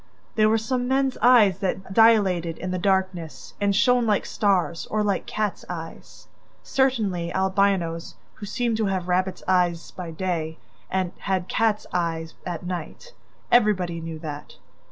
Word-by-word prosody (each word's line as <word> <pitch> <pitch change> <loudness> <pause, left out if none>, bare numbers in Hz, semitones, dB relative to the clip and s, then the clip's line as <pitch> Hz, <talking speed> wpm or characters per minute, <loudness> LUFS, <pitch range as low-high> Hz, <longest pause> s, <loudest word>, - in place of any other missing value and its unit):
There 215 -1 +4
were 220 - +3
some 245 +3 -1
men's 265 0 +1
eyes 220 -6 +6
that 190 0 -3
dilated 190 -7 +4
in 185 - -4
the 185 - -2
darkness 190 -4 -1
and 200 -1 +2
shone 245 +2 +3
like 210 -2 +1
stars 185 -5 0
or 215 0 0
like 200 -2 -1
cats' 210 -3 -2
eyes. 165 -2 -8 0.4
Certainly 215 -11 0
Albinos, 190 -3 0 0.2
who 205 - -9
seemed 240 0 -1
to 220 -2 0
have 185 -2 -2
rabbits' 185 +1 0
eyes 180 -2 +1
by 180 -2 -7
day, 160 -2 -3 0.3
had 185 0 -2
cats' 220 -2 +1
eyes 165 -2 -2
at 175 -1 -5
night: 180 - -6 0.4
everybody 190 -8 +3
knew 165 -1 -6
that! 150 -2 -8
190 Hz, 145 wpm, -24 LUFS, 175-215 Hz, 0.4 s, eyes